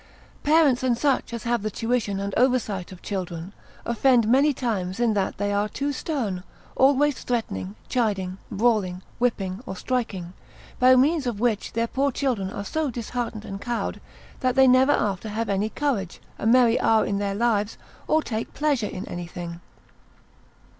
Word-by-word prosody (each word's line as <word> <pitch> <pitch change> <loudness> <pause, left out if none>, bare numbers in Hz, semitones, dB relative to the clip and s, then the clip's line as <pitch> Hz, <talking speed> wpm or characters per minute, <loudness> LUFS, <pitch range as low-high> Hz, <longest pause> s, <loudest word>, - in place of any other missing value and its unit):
Parents 295 -4 +4
and 250 -2 +1
such 275 -2 +1
as 235 -2 -5
have 235 -1 0
the 215 - -2
tuition 225 -2 -1
and 200 0 -3
oversight 230 -8 +1
of 185 - -12
children, 180 -2 -4 0.3
offend 235 -1 +3
many 275 +6 +5
times 210 -8 -2
in 235 -2 +3
that 195 -2 -1
they 205 0 -1
are 205 +1 +1
too 280 +6 -2
stern, 240 - -2 0.3
always 280 +1 +3
threatening, 100 - -3
chiding, 195 -6 -1
brawling, 205 -4 +1 0.2
whipping, 200 -5 -1
or 190 - -4
striking; 200 -7 -3 0.5
by 255 +1 +7
means 280 +2 +3
of 225 -4 -2
which 225 -3 0
their 230 +1 +1
poor 275 +4 0
children 240 -8 -1
are 200 - -5
so 315 +5 -1
disheartened 235 -2 -4
and 195 0 -6
cowed, 240 -1 -3 0.4
that 255 -1 +1
they 265 -1 +6
never 255 +2 +5
after 210 -5 0
have 220 +2 -2
any 200 +2 0
courage, 225 - -2 0.2
a - - -1
merry 240 0 +5
hour 220 -1 +3
in 200 - -1
their 200 -1 -1
lives, 215 -2 +1 0.3
or 310 0 +3
take 220 -1 -4
pleasure 285 -8 +1
in 185 - -6
anything. 175 -1 -6
230 Hz, 165 wpm, -25 LUFS, 200-255 Hz, 0.5 s, by